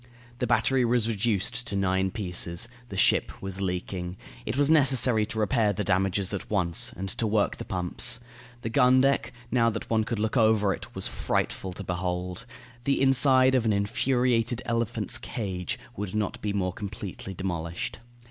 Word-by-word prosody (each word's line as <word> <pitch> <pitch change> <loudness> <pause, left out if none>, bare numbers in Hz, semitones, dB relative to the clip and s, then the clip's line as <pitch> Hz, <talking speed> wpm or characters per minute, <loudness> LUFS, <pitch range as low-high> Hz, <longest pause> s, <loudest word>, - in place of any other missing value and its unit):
The 125 - 0
battery 120 +3 +2
was 120 -1 +2
reduced 115 +3 -1
to 100 - -2
nine 95 -1 +1
pieces. 90 -1 -1 0.2
The 95 - -6
ship - - +2
was 95 0 -6
leaking. 90 -1 -3 0.3
It 110 - -2
was 145 0 +4
necessary 130 -7 +4
to - - -6
repair 110 -1 +2
the 105 - -2
damages 95 +1 +1
at 100 - -5
once, 90 -5 +1
and 95 +2 -4
to 110 - -1
work 105 -1 +1
the - - -7
pumps. 90 +5 +1 0.4
The 115 - -4
gun 130 +1 +5
deck, 135 +1 +1 0.2
now 115 -2 +3
that 115 0 -6
one 110 -1 +3
could 115 +1 -3
look 110 +3 -1
over 110 -3 +3
it, - - -10
was - - -2
frightful 95 - -2
to 100 - -7
behold. 90 +3 -3 0.4
The 140 - +2
inside 130 -1 +5
of 130 -3 +3
an 110 -2 +2
infuriated 120 +3 +1
elephant's 115 -2 0
cage 95 -8 -4 0.2
would 100 0 -5
not 105 -2 -2
be 105 - -1
more 95 -3 -1
completely 100 -2 -7
demolished. 90 +5 -4
105 Hz, 170 wpm, -27 LUFS, 95-120 Hz, 0.4 s, gun